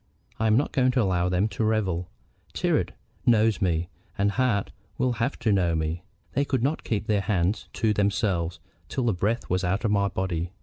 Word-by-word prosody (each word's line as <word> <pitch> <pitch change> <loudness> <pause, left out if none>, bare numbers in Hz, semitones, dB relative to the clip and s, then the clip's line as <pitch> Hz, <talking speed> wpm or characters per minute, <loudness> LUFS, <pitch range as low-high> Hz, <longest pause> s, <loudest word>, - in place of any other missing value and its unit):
I 110 - +2
am 110 +1 +4
not 140 - +1
going 130 -1 +3
to 125 - +3
allow 90 -2 +1
them 90 +3 +2
to 105 +2 -2
revel. 95 -6 0 0.5
Tyrrwhit - - +1 0.4
knows 110 -2 +4
me, 85 -2 +1 0.3
and 100 +1 +2
Hart 115 -4 +1 0.3
will 130 - +2
have 125 +5 0
to 110 - +1
know 90 -4 +2
me. 80 +2 -2 0.3
They 140 - +2
could 130 -4 -1
not 145 +4 0
keep 110 -2 -1
their 105 -2 +1
hands 95 0 0
to 110 -2 +1
themselves 100 -4 0 0.3
till 130 - -1
the 115 - +2
breath 105 +6 -1
was 90 +1 0
out 95 +5 0
of 110 - +2
my 100 -1 +3
body. 90 -2 -2
100 Hz, 200 wpm, -26 LUFS, 90-115 Hz, 0.5 s, am